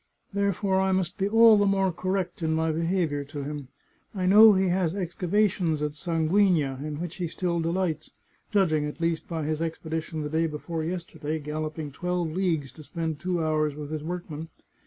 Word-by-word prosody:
Therefore 200 -1 +1
I 190 0 +2
must 185 +1 -1
be 195 +1 +1
all 225 0 +7
the 205 0 +3
more 195 -1 +2
correct 185 +1 -2
in 160 -1 +1
my 160 0 +1
behaviour 165 -3 0
to 145 0 -6
him. 145 -1 -5 0.5
I 185 -2 -1
know 210 +3 +8
he 190 -1 +2
has 180 -1 +1
excavations 180 -3 0
at 150 - -1
Sanguigna 160 -3 +1
in 150 -1 -4
which 175 -1 -5
he 180 -2 -2
still 170 +1 -2
delights 165 -1 -1 0.2
— - - -39
^judging, 160 -8 +2
at 150 - -10
least, 165 -1 -1
by 165 -2 -3
his 155 +1 -1
expedi 160 0 -2
tion 155 -1 -5
the 150 - -3
day 160 +2 +1
before 160 +1 -4
yesterday, 160 -3 -4
galloping 155 0 -4
twelve 175 +2 -2
leagues 165 -6 -1
to 155 - -13
spend 160 -1 -4
two 175 0 -1
hours 155 -2 +1
with 150 0 -7
his 155 -1 -3
workmen. 165 -2 -5
165 Hz, 190 wpm, -27 LUFS, 155-185 Hz, 0.5 s, know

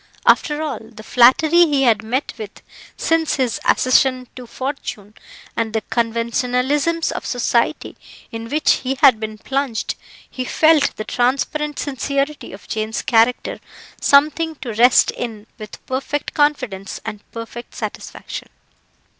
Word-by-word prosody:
After 300 0 +3
all 285 -7 -3
the 220 -1 -13
flattery 310 +9 +5
he 285 -3 +1
had 225 -4 +3
met 245 +6 -2
with 210 -2 -9 0.3
since 325 -1 +1
his 255 -5 -1
accession 255 0 +3
to 250 -2 -9
fortune, 245 -6 -6 0.4
and 225 -1 -2
the 220 -2 -1
conventionalisms 250 +7 0
of - - -5
society 245 +3 0 0.4
in 225 -1 -6
which 305 +3 +2
he 265 +1 -2
had 255 -4 +5
been 215 0 -5
plunged, 265 0 -2 0.3
he 255 - -5
felt 310 +2 +3
the 215 - -5
transparent 280 +4 -1
sincerity 280 +1 -2
of 195 - -12
Jane's 220 0 -3
character 230 +1 +2 0.4
something 310 +3 +3
to 250 -5 -6
rest 245 +4 +5
in 220 -3 -6
with 215 -1 -10
perfect 270 +2 -3
confidence 255 -10 -1
and 215 -2 -5
perfect 230 +1 -8
satisfaction. - - -7
255 Hz, 130 wpm, -20 LUFS, 225-285 Hz, 0.4 s, flattery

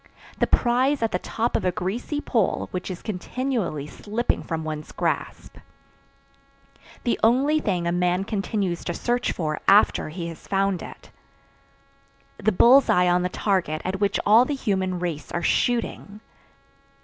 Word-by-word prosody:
The - - +2
prize 255 +2 +2
at 225 - 0
the 180 - -1
top 230 +5 -2
of - - 0
a 180 - +2
greasy 215 - -3
pole 235 -6 0
which 180 +1 -4
is 180 -2 -7
continually 210 - -3
slipping 215 +9 -2
from 160 -2 -4
one's 155 -1 -6
grasp. - - -3 1.5
The 240 - 0
only 270 +7 +3
thing 180 - -1
a 170 - +1
man 180 +1 +1
continues 195 -3 -2
to 175 - -3
search 245 0 0
for 155 -3 -3
after 200 -5 +4
he 170 +2 -5
has 165 - -11
found 195 -1 0
it. - - -11 1.3
The 215 +1 +2
bull's 245 +7 +6
eye 180 0 +4
on 175 0 +3
the 180 - -1
target 180 -6 0
at 190 +1 -2
which 200 -1 +1
all 220 +4 +7
the 285 +3 -2
human 190 -7 -1
race 170 -4 -4
are 175 - -2
shooting. 230 -3 -1
195 Hz, 155 wpm, -24 LUFS, 175-235 Hz, 1.5 s, all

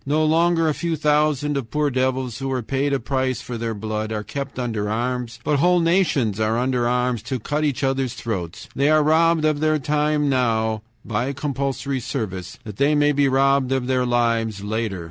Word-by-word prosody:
No 155 +3 +2
longer 165 +1 +3
a 155 - +2
few 170 +2 -2
thousands 150 -1 +1
of 115 -4 -8
poor 150 -1 0
devils, 130 -2 -1
who 135 - -3
were 130 -2 -2
paid 135 +4 -1
a 140 - +1
price 130 +1 -1
for 140 -3 -6
their 115 -1 -3
blood, 110 +1 -3
are 105 -1 -3
kept 140 +5 -6
under 110 -5 -2
arms, 120 +1 -2
but 150 - +1
whole 180 +3 +4
nations 165 - +1
are 110 +1 +1
under 125 -1 +1
arms 125 -1 0
to 130 - -3
cut 150 +7 -2
each 145 -1 -1
other's 135 -2 0
throats. 90 -8 -5
They 140 +2 +2
are 155 0 +4
robbed 160 +1 +3
of 155 -1 +1
their 155 0 +2
time 150 +1 +1
now 110 -5 +1 0.2
(by 120 +5 -1
compulsory 140 -1 -2
service) 100 -8 -5
that 105 -2 -9
they 145 +2 +3
may 145 0 +4
be 145 -1 +2
robbed 135 0 +2
of 130 -2 0
their 130 0 +1
lives 115 -4 0
later. 110 -2 -2
130 Hz, 200 wpm, -22 LUFS, 115-150 Hz, 0.2 s, whole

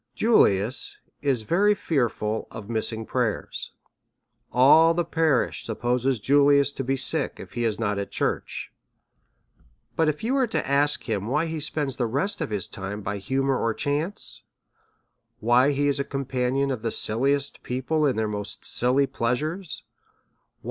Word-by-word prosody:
Julius 120 - +2 0.2
is 135 -6 +1
very 205 - +3
fearful 120 - -1
of 110 0 -8
missing 110 0 -1
prayers; 120 -3 -3 0.8
all 160 +6 +6
the 175 0 0
parish 160 -6 +1
supposes 125 +2 -1
Julius 140 +3 +4
to 135 - -5
be 135 +1 0
sick - - +3
if - - -10
he 120 - -1
is 110 -2 0
not 105 -3 -1
at 100 - -4
church. - - -3 1.2
But 160 -1 +2
if 150 +5 -4
you 240 +4 0
were 265 -2 +2
to - - -2
ask 140 -2 +2
him 100 +1 -2
why 150 +6 +1
he 160 -1 -4
spends 145 -3 -2
the 120 - 0
rest 145 - -1
of - - -2
his 105 -4 -2
time 100 +2 -6
by 100 +1 -3
humour 135 +6 0
or 115 -1 0
chance? 155 +9 -2 1.0
why 125 +5 +4
he 145 +1 0
is 140 -1 +1
a - - +1
compa 135 -3 -2
nion 140 +1 0
of 120 - -6
the 115 - -1
silliest 135 +7 0
people 145 +5 0
in 130 - +1
their 110 0 0
most 105 -1 -6
silly 130 +3 +2
pleasures 150 +9 -3
135 Hz, 160 wpm, -25 LUFS, 115-145 Hz, 1.2 s, all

